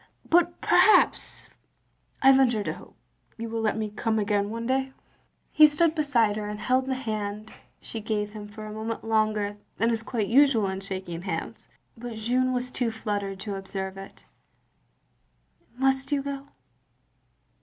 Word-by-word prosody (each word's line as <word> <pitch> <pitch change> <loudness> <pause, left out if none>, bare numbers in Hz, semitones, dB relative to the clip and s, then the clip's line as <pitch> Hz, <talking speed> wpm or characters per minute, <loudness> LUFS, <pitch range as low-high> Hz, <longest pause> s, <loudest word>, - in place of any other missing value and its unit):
But 345 0 +3
perhaps 430 - +4 0.4
— - - -41
I 270 - +9
venture 250 -5 +3
to - - -2
hope - - -14 0.2
— - - -38
^you 230 - -4
will 225 0 -2
let 220 0 0
me 215 -1 -3
come 220 +1 -1
again 205 -1 +1
one 230 +1 -4
day?" 265 +1 0 0.6
He 310 0 +8
stood 310 +2 +2
beside 245 -9 +2
her, 210 -1 -4
and 210 0 -5
held 255 +2 +1
the 265 - 0
hand 215 -3 -4 0.3
she 225 - -6
gave 210 -1 -2
him 210 -1 -8
for 215 +1 -9
a 215 - -7
moment 220 +1 -4
longer 215 -2 0 0.2
than 230 +1 +2
is 225 -1 0
quite 225 -2 -2
usual 260 -3 +4
in 190 0 -3
shaking 185 -3 -5
hands; 190 +1 -5 0.3
but 240 0 -7
Jeanne 250 +4 +1
was 250 0 -2
too 245 -2 0
fluttered 205 -3 -3
to 205 -1 -4
observe 195 0 -5
it. 195 0 -11 1.5
"Must 265 +1 +1
you 280 -1 +1
go?" 280 0 -5
225 Hz, 165 wpm, -26 LUFS, 210-260 Hz, 1.5 s, I